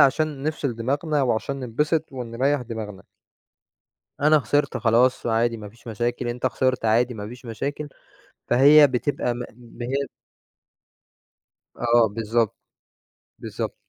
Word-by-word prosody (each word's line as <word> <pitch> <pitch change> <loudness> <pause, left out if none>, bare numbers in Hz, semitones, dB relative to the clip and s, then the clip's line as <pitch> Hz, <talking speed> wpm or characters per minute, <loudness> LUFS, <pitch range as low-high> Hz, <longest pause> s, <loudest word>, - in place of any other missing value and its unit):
عشان 145 0 +3
نفصِل 145 -4 -2
دماغنا 145 +5 0
وعشان 135 +2 -1
ننبسط 150 +6 -1
ونريّح 130 +2 -1
دماغنا. 110 -4 -7 1.2
أنا 150 +2 +5
خسِرت 145 +3 0
خلاص، 120 +3 +2
عادي 115 0 +1
ما 105 -2 -9
فيش 115 +4 -21
مشاكل، 120 +2 -2
أنت 120 +2 -2
خسِرت 130 0 0
عادي 120 +3 +2
ما 105 -1 -6
فيش 125 +3 -11
مشاكل، 140 +6 -4 0.6
فهي 145 +4 +7
بتبقى 130 -1 -1
م 120 - -5
إن 120 -1 -14
هي 135 +3 -2 1.7
آه، 120 -1 +3
بالضبط 115 0 0 0.8
بالضبط. - - -5
125 Hz, 120 wpm, -24 LUFS, 115-140 Hz, 1.7 s, فهي